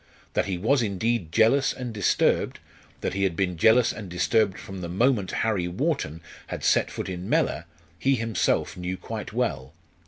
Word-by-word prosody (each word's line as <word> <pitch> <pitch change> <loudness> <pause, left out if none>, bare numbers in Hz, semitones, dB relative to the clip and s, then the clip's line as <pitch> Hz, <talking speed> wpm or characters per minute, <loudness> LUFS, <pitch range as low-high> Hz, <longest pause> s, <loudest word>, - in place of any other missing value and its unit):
That - - +1
he 95 -2 -2
was 120 +9 +2
indeed 105 -3 -1
jealous 115 +7 +4
and 125 -3 -6
disturbed, 105 -3 +1 0.4
that - - -2
he 100 - -2
had 95 -3 +1
been 90 0 0
jealous 110 +8 +4
and 105 -4 -8
disturbed 95 +2 +1
from 95 +1 -8
the 85 - -5
moment 105 +1 +2
Harry 105 -6 0
Wharton 90 - -2 0.3
had - - -6
set - - +3
foot - - -5
in 90 0 -5
Mellor, 80 +4 +1 0.3
he 135 0 +3
himself 115 -2 0
knew 90 +1 -4
quite - - -6
well. 65 +3 -2
100 Hz, 175 wpm, -26 LUFS, 90-115 Hz, 0.4 s, jealous